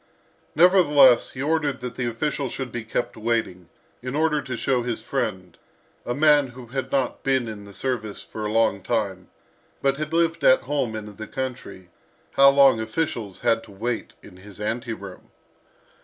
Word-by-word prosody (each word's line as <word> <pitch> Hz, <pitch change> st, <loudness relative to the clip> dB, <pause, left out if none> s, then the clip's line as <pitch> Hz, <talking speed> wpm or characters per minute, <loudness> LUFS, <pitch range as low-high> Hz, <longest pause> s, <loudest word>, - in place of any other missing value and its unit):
Nevertheless, 150 Hz, -8 st, +6 dB
he 130 Hz, -, -6 dB
ordered 150 Hz, -3 st, 0 dB
that 125 Hz, -1 st, -6 dB
the 125 Hz, -1 st, -2 dB
official 135 Hz, +3 st, -2 dB
should 130 Hz, -1 st, -5 dB
be 120 Hz, -1 st, -4 dB
kept 110 Hz, +2 st, -3 dB
waiting, 110 Hz, -6 st, -2 dB, 0.3 s
in 125 Hz, +2 st, -5 dB
order 150 Hz, -1 st, +1 dB
to 130 Hz, -3 st, -5 dB
show 130 Hz, -1 st, +1 dB
his 120 Hz, -1 st, -4 dB
friend, 95 Hz, -2 st, -3 dB, 0.5 s
a 120 Hz, -, -1 dB
man 150 Hz, -2 st, +4 dB
who 125 Hz, 0 st, -11 dB
had 130 Hz, +2 st, -5 dB
not 135 Hz, -2 st, 0 dB
been 130 Hz, -3 st, +1 dB
in 105 Hz, -2 st, -8 dB
the 100 Hz, -, -13 dB
service 115 Hz, -6 st, -3 dB
for 110 Hz, -, -7 dB
a 105 Hz, -, -2 dB
long 110 Hz, -3 st, +2 dB
time, 95 Hz, -4 st, -2 dB, 0.5 s
but 135 Hz, 0 st, +1 dB
had 155 Hz, +1 st, -4 dB
lived 165 Hz, 0 st, +1 dB
at 130 Hz, -, +6 dB
home 130 Hz, -5 st, -2 dB
in 105 Hz, -2 st, -8 dB
the 110 Hz, -, -7 dB
country, 120 Hz, -9 st, -6 dB, 0.4 s
how 140 Hz, 0 st, +7 dB
long 140 Hz, -4 st, +5 dB
officials 110 Hz, -, -3 dB
had 115 Hz, 0 st, +2 dB
to 110 Hz, -, -15 dB
wait 115 Hz, +4 st, -4 dB
in 90 Hz, -, -14 dB
his 100 Hz, +1 st, -14 dB
ante 115 Hz, +3 st, -3 dB
room. 100 Hz, -3 st, -11 dB
120 Hz, 175 wpm, -24 LUFS, 110-140 Hz, 0.5 s, how